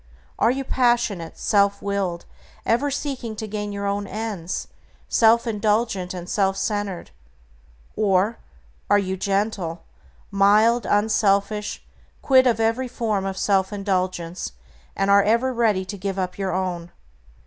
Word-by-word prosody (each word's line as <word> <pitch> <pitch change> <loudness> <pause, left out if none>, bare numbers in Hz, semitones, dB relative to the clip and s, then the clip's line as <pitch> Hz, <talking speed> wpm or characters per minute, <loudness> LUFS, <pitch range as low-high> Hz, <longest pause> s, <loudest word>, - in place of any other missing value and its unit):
Are - - +4
you 270 +2 -1
passionate, 240 -10 0
self 200 -1 +2
willed, 195 -4 -2 0.4
ever 245 +6 +2
seeking 265 -5 -4
to 220 - -5
gain 210 0 -4
your 200 0 -4
own 200 0 -1
ends, 205 -5 -4 0.4
self 230 +1 +4
indulgent, 210 -3 0
and 180 -1 -6
self 195 -1 +1
centered; 205 -3 -3 0.8
or 205 +2 +1 0.5
are 205 - +6
you 190 -2 -1
gentle, 195 -3 -2 0.5
mild, 210 +4 +4
unselfish, 205 0 +1 0.4
quit 260 -1 +5
of 230 -2 +2
every 230 +3 +1
form 215 -5 -2
of 190 0 -4
self 190 0 +1
indulgence, 185 - -2 0.4
and 195 0 +1
are 200 0 +7
ever 235 +5 +2
ready 215 -6 +1
to 200 +2 -6
give 195 0 -3
up 185 -1 -2
your 195 -1 -2
own? 175 -2 -3
200 Hz, 135 wpm, -23 LUFS, 190-225 Hz, 0.8 s, are